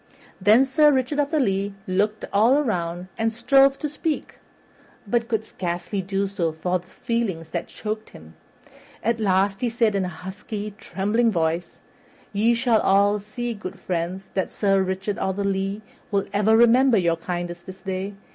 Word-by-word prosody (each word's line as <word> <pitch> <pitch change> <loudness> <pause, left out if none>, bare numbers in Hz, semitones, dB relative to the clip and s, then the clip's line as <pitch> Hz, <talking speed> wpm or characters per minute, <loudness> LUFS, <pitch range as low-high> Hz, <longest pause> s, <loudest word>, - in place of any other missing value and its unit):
Then 215 +7 +6
Sir 295 +3 +5
Richard 265 +2 0
of 285 -1 +1
the 310 -1 +1
Lea 200 -4 0
looked 210 +3 0
all 225 +6 +5
around 180 - -1
and 225 0 +1
strove 270 +4 +4
to 300 - -3
speak, 300 +1 -4 0.7
but 230 +2 0
could 220 -2 -1
scarcely 180 +1 -3
do 195 +1 -1
so 190 -4 -1
for 180 +3 -1
the 175 - -20
feelings 200 -9 -3
that 170 0 -3
choked 215 0 -5
him; 80 +1 -14 0.7
at 230 +1 +1
last 195 -1 +1
he 245 - +1
said 230 -2 +2
in 195 -1 0
a - - -1
husky, 200 +4 -6
trembling 210 +6 +1
voice, 170 -1 -1 0.6
"Ye 225 +4 +3
shall 230 -2 +2
all 200 +2 +3
see, 235 +4 -4
good 195 -2 -7
friends, 185 +2 -3
that 190 - -1
Sir 195 -2 +2
Richard 190 +2 -2
o' 190 - 0
the 200 +1 -3
Lea 195 +2 -2 0.3
will 200 -2 0
ever 210 +2 +4
remember 240 +1 +5
your 170 -3 +2
kindness 175 0 -4
this 185 +1 -11
day. 190 +1 -4
200 Hz, 170 wpm, -24 LUFS, 185-230 Hz, 0.7 s, Then